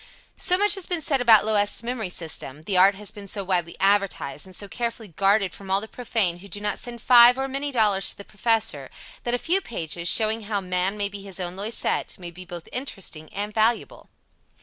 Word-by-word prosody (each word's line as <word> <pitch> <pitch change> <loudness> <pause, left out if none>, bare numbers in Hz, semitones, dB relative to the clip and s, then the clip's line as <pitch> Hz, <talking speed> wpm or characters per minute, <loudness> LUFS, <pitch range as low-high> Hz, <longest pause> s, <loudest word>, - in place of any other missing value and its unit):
So 360 - +3
much 415 +2 +4
has 390 -3 -3
been 355 -2 -1
said 275 -3 +2
about 225 -4 +6
Loisette's 210 0 +2
memory 230 -5 -3
system, 155 -4 -2
the 195 +3 -2
art 190 +2 +6
has 205 +1 -3
been 205 -2 -11
so 200 +1 -3
widely 180 -3 -1
advertised, 195 -5 0
and 185 - -10
so 200 - -6
carefully 230 -1 -4
guarded 195 +1 +2
from 195 -1 -11
all 195 +1 +3
the 220 - -8
profane 220 -8 -1
who 200 - -12
do 200 +1 -5
not 210 0 -2
send 235 -2 -7
five 245 0 +7
or 270 0 -2
many 275 +2 -3
dollars 210 -6 +2
to - - -4
the 200 - -11
Professor, 215 - 0 0.4
that 240 0 0
a - - 0
few 355 +9 0
pages, 170 - -3
showing 220 +3 +3
how 205 -1 -1
man 185 +1 -1
may 205 -1 0
be 200 0 -8
his 195 -1 -7
own 180 0 -4
Loisette, 210 +4 -1
may 175 -2 -9
be 180 +2 -10
both 175 -1 -9
interesting 195 - -5
and 205 +1 -4
valuable. 225 +2 0
205 Hz, 215 wpm, -24 LUFS, 185-235 Hz, 0.4 s, five